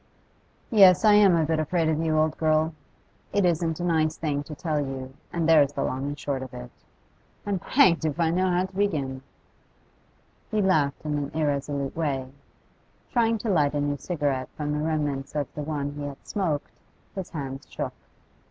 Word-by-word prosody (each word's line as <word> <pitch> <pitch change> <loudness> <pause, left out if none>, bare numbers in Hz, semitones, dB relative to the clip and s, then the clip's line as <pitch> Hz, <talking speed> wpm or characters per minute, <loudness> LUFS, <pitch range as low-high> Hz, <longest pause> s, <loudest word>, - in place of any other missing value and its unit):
'Yes, 195 -2 +7
I 210 - +7
am 205 -4 +6
a 160 -2 +2
bit 160 0 0
afraid 160 +1 +1
of 155 -1 +1
you, 160 -1 +1
old 155 0 +2
girl. 155 0 +2 0.6
It 200 -2 +2
isn't 165 -1 0
a - - -3
nice 160 -2 +1
thing 145 -3 -1
to 150 - -8
tell 160 -3 -1
you, 130 -1 -6 0.2
and 170 -2 -1
there's 150 -3 +5
the - - -2
long 130 +2 -2
and 145 0 -4
short 140 -3 -3
of 130 -1 -8
it. - - -8 0.7
I'm 200 -2 -1
hanged 185 - +4
if 155 0 -1
I 165 -1 +2
know 185 +2 +1
how 180 +1 +2
to 190 0 -12
begin.' 145 -10 -1 1.3
He 215 - 0
laughed 155 -8 +1
in 150 -1 -1
an 140 -1 -3
irresolute 140 -2 -1
way. 135 -5 -2 0.8
Trying 230 -2 +2
to - - 0
light 150 -5 +2
a - - +1
new 145 0 -1
cigarette 140 -5 -2
from 150 -1 -2
the 150 0 -1
remnants 150 -3 -2
of 145 -3 -2
the 150 - -5
one 145 -1 -3
he 145 0 -8
had 145 -1 -7
smoked, 165 -8 -2 0.4
his 190 -2 -5
hands 135 -3 -6
shook. - - -4
155 Hz, 190 wpm, -26 LUFS, 145-175 Hz, 1.3 s, Yes